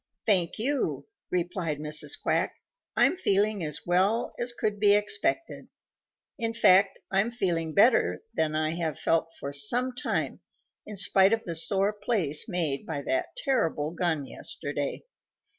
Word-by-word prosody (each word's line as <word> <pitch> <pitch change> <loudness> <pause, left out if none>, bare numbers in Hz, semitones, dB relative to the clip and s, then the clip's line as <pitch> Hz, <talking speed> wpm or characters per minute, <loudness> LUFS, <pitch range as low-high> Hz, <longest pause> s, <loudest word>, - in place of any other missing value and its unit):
"Thank 185 -6 +3
you," 270 +5 -1 0.2
replied 175 -3 -2
Mrs. 150 -1 -1
Quack. - - 0 0.4
"I'm - - +4
feeling 205 - +1
as 150 -2 -4
well 190 +6 +1
as 240 0 -1
could 210 -3 -2
be 205 -1 +5
expected. 330 +11 -1 0.7
In 230 -1 -2
fact, 195 -3 +5
I'm 195 +4 +2
feeling 170 -9 -2
better 230 - +4
than 155 -1 0
I 155 0 0
have 165 -2 -3
felt 165 0 +1
for 140 +1 -5
some 245 - 0
time 245 - -2 0.5
in 210 - -7
spite 195 +1 +5
of 225 - 0
the 170 - -4
sore 195 +5 +1
place 205 -7 -1
made 160 -7 -1
by 145 -3 -4
that 330 +7 -2
terrible 165 - 0
gun 170 -4 -1
yesterday. 145 +1 -5
185 Hz, 140 wpm, -27 LUFS, 160-215 Hz, 0.7 s, be